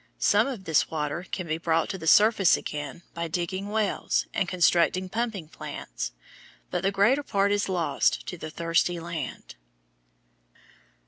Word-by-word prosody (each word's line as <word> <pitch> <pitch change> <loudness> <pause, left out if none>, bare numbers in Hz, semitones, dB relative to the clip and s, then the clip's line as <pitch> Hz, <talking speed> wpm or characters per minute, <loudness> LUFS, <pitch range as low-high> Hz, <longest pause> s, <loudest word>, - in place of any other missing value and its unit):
Some - - +3
of 245 -8 -5
this 160 -4 +2
water 155 +3 -3
can 185 - -3
be 160 0 -2
brought 165 -1 +1
to 190 - -3
the 160 - -6
surface 205 0 +6
again 150 +1 -6
by 170 0 -3
digging 180 +4 -3
wells 215 -1 0
and 180 - 0
constructing 180 +1 +2
pumping 220 -5 -3
plants, - - -6 0.6
but 180 - -1
the 195 - +2
greater 210 +9 +3
part 200 -7 +1
is 205 -1 +1
lost 175 -3 +1
to - - -5
the 155 -2 -7
thirsty 170 +2 0
land. 165 -4 -6
175 Hz, 150 wpm, -27 LUFS, 165-195 Hz, 0.6 s, surface